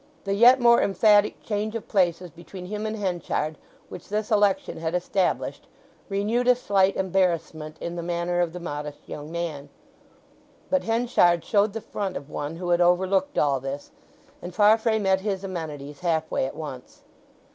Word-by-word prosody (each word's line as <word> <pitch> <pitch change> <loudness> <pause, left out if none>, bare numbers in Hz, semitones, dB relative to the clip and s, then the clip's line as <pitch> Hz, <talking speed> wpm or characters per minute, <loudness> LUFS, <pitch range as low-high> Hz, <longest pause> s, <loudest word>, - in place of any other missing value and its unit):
The 195 - -1
yet 245 +6 +7
more 235 -1 +5
emphatic 205 +2 +3
change 215 +1 -2
of 230 - -5
places 180 -3 +1
between 175 +3 -10
him 210 +3 -4
and 215 - -3
Henchard 175 -6 -2 0.3
which - - -10
this 210 +1 -2
election 205 -5 +2
had 165 +1 -2
established 180 +1 -1 0.4
renewed 215 +5 0
a 250 - +6
slight 195 -5 +2
embarrassment 170 -5 -1
in 170 0 -5
the - - -2
manner 175 +1 -1
of 175 -2 0
the 180 - -7
modest 150 -3 -5
young 150 +1 -7
man; 160 -4 -4 1.0
but 280 - +1
Henchard 225 -7 +2
showed 205 -1 +2
the 225 - -4
front 195 -3 -4
of 140 - -10
one 145 +2 -4
who 175 +1 -5
had 175 0 +3
overlooked 185 +2 +2
all 140 -2 +2
this; 135 +2 -6 0.5
and 175 0 -8
Farfrae 220 +2 +4
met 190 -2 +1
his 195 -1 -2
amenities 150 -6 -6
half 160 -3 -1
way 130 - 0
at 135 - -8
once. 150 -5 -9
185 Hz, 170 wpm, -25 LUFS, 165-205 Hz, 1.0 s, yet